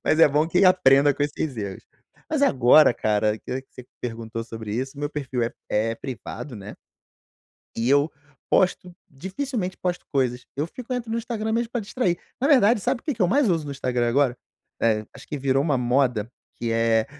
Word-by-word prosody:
Mas 155 Hz, -, +2 dB
é 165 Hz, -, +8 dB
bom 150 Hz, +3 st, +1 dB
que 180 Hz, +3 st, +3 dB
aprenda 145 Hz, -6 st, +5 dB
com 145 Hz, -, -2 dB
esses 145 Hz, -1 st, -2 dB
erros. 100 Hz, -3 st, -5 dB, 0.5 s
Mas 305 Hz, -2 st, 0 dB
agora 130 Hz, -, +6 dB
cara, 105 Hz, 0 st, +1 dB
que 130 Hz, +4 st, -5 dB
que 130 Hz, -, -37 dB
você 125 Hz, -, -10 dB
me 125 Hz, -, -26 dB
perguntou 115 Hz, -1 st, -5 dB
sobre 110 Hz, -2 st, -6 dB
isso, 135 Hz, +4 st, -4 dB
meu 145 Hz, 0 st, -2 dB
perfil 135 Hz, -5 st, -3 dB
é 115 Hz, -, -2 dB, 0.2 s
é 110 Hz, +2 st, 0 dB
privado, 130 Hz, 0 st, -7 dB
né 100 Hz, +1 st, -9 dB, 1.0 s
e 115 Hz, +2 st, 0 dB
eu 145 Hz, +3 st, +4 dB, 0.4 s
posto, 180 Hz, -1 st, +1 dB, 0.2 s
dificilmente 190 Hz, -, -4 dB
posto 180 Hz, -1 st, -3 dB
coisas, 125 Hz, -3 st, 0 dB
eu 145 Hz, +3 st, -1 dB
fico 250 Hz, +8 st, -8 dB
entro 245 Hz, -2 st, -3 dB
no 225 Hz, -, -1 dB
Instagram 220 Hz, -2 st, -3 dB
mesmo 230 Hz, 0 st, 0 dB
para 240 Hz, -, -2 dB
distrair. 200 Hz, -4 st, -1 dB, 0.2 s
Na 265 Hz, -, +2 dB
verdade, 240 Hz, -6 st, +5 dB
sabe 245 Hz, +3 st, -1 dB
o -, -, -37 dB
que 295 Hz, -, -1 dB
que 220 Hz, -, -1 dB
eu 180 Hz, -, +3 dB
mais 275 Hz, +4 st, +3 dB
uso 165 Hz, -4 st, +1 dB
no 145 Hz, -, -6 dB
Instagram 125 Hz, -3 st, -1 dB
agora? 130 Hz, 0 st, +2 dB, 0.4 s
Eh, 110 Hz, -2 st, +1 dB
acho -, -, -13 dB
que 145 Hz, -, -5 dB
virou 135 Hz, 0 st, +2 dB
uma 145 Hz, -3 st, +1 dB
moda, 125 Hz, -3 st, +1 dB, 0.3 s
que 115 Hz, -, -3 dB
é 115 Hz, -1 st, +2 dB
140 Hz, 200 wpm, -24 LUFS, 120-185 Hz, 1.0 s, é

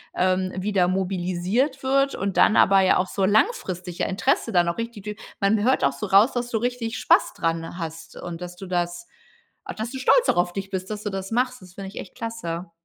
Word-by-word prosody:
ähm, 185 Hz, 0 st, +1 dB
wieder 190 Hz, -1 st, +1 dB
mobilisiert 190 Hz, -, -1 dB
wird 275 Hz, +1 st, +2 dB
und 195 Hz, 0 st, -3 dB
dann 220 Hz, -, +5 dB
aber 195 Hz, 0 st, +6 dB
ja 190 Hz, -, +4 dB
auch 185 Hz, -, 0 dB
so 195 Hz, -, -2 dB
langfristig 190 Hz, -, 0 dB
ja -, -, +1 dB
Interesse 230 Hz, +4 st, 0 dB
dann 175 Hz, -3 st, +3 dB
auch 170 Hz, -, -1 dB
richtig 230 Hz, -3 st, -5 dB
durch 210 Hz, -1 st, -5 dB, 0.2 s
man 205 Hz, +1 st, +2 dB
hört 260 Hz, +3 st, +2 dB
auch -, -, +2 dB
so -, -, -5 dB
raus, 200 Hz, +6 st, +5 dB
dass 245 Hz, 0 st, -2 dB
du 230 Hz, -, 0 dB
richtig 240 Hz, 0 st, -2 dB
Spaß -, -, +3 dB
dran 165 Hz, 0 st, -2 dB
hast 165 Hz, -2 st, -7 dB
und 175 Hz, -1 st, -7 dB
dass 180 Hz, 0 st, -7 dB
du 195 Hz, -, -8 dB
das 175 Hz, -1 st, -2 dB, 0.6 s
a -, -, -6 dB
dass 220 Hz, +2 st, -5 dB
du 265 Hz, -, -5 dB
stolz -, -, +4 dB
auch -, -, +3 dB
auf 175 Hz, 0 st, +2 dB
dich 195 Hz, 0 st, -5 dB
bist 190 Hz, -1 st, -4 dB
dass 210 Hz, -1 st, -5 dB
du 210 Hz, -, -2 dB
das 195 Hz, 0 st, -5 dB
machst. 250 Hz, +1 st, 0 dB
Das 185 Hz, -1 st, -14 dB
finde 195 Hz, -1 st, -7 dB
ich 200 Hz, -, -8 dB
echt 185 Hz, -, -9 dB
klasse. 190 Hz, -8 st, -5 dB
195 Hz, 230 wpm, -24 LUFS, 180-230 Hz, 0.6 s, aber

